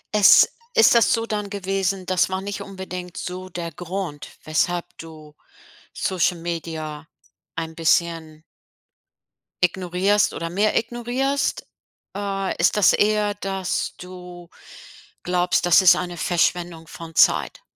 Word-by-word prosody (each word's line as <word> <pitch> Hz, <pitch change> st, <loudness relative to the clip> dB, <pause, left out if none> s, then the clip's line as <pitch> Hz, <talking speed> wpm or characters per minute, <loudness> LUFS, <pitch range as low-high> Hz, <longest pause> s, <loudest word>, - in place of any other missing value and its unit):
Es 205 Hz, -2 st, +7 dB, 0.3 s
ist 455 Hz, -, +6 dB
das 235 Hz, -1 st, +4 dB
so 230 Hz, -1 st, +1 dB
dann 210 Hz, -2 st, -3 dB
gewesen, 195 Hz, -1 st, -2 dB
das 185 Hz, 0 st, +1 dB
war 190 Hz, 0 st, -2 dB
nicht 200 Hz, +1 st, -5 dB
unbedingt 185 Hz, -2 st, -8 dB
so 185 Hz, +1 st, -6 dB
der 170 Hz, -1 st, -5 dB
Grund, 175 Hz, -4 st, -6 dB
weshalb 170 Hz, +3 st, 0 dB
du 155 Hz, -2 st, -12 dB, 0.6 s
Social-Media 165 Hz, -4 st, -3 dB, 0.5 s
ein 160 Hz, 0 st, -5 dB
bisschen 165 Hz, -1 st, 0 dB, 1.2 s
ignorierst 185 Hz, +3 st, +1 dB
oder 165 Hz, 0 st, -4 dB
mehr 205 Hz, +4 st, +1 dB
ignorierst? 245 Hz, +4 st, -1 dB, 0.5 s
Äh, 195 Hz, -1 st, -2 dB
ist 170 Hz, -, +2 dB
das 210 Hz, -2 st, +5 dB
eher, 210 Hz, 0 st, +2 dB
dass 195 Hz, -2 st, -3 dB
du 180 Hz, -1 st, -11 dB, 0.7 s
glaubst, 180 Hz, -1 st, +1 dB
dass 175 Hz, +2 st, +6 dB
es 185 Hz, -, +8 dB
eine 175 Hz, -1 st, -4 dB
Verschwendung 170 Hz, -1 st, -1 dB
von 165 Hz, +1 st, -10 dB
Zeit? -, -, +3 dB
180 Hz, 120 wpm, -22 LUFS, 170-200 Hz, 1.2 s, es